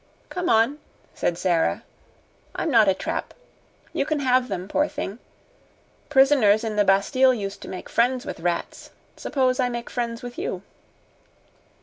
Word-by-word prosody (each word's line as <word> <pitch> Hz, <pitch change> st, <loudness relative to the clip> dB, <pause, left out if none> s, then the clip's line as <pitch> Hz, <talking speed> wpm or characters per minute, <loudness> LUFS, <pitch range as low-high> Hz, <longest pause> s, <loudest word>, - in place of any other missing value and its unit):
"Come 360 Hz, -1 st, -2 dB
on," 230 Hz, +7 st, +3 dB, 0.3 s
said 170 Hz, -, -1 dB
Sara; 175 Hz, -2 st, +1 dB, 0.7 s
"I'm 325 Hz, -, -1 dB
not 225 Hz, -4 st, +6 dB
a 195 Hz, -, +5 dB
trap. -, -, -4 dB, 0.6 s
You -, -, +1 dB
can 310 Hz, -2 st, -1 dB
have 255 Hz, -1 st, +3 dB
them, 185 Hz, -5 st, -4 dB
poor 295 Hz, +8 st, +1 dB
thing! 285 Hz, -8 st, -5 dB, 0.9 s
Prisoners 265 Hz, -7 st, +5 dB
in 220 Hz, -2 st, -3 dB
the 210 Hz, -, +4 dB
Bastille 255 Hz, +7 st, +3 dB
used 200 Hz, -3 st, -5 dB
to -, -, -9 dB
make 185 Hz, -1 st, -7 dB
friends 245 Hz, +2 st, +1 dB
with -, -, -6 dB
rats. 175 Hz, +1 st, -3 dB, 0.3 s
Suppose 255 Hz, -2 st, 0 dB
I 250 Hz, -1 st, +2 dB
make 240 Hz, -1 st, -5 dB
friends 235 Hz, -1 st, -3 dB
with 245 Hz, 0 st, -7 dB
you." 185 Hz, 0 st, -4 dB
235 Hz, 150 wpm, -24 LUFS, 200-260 Hz, 0.9 s, not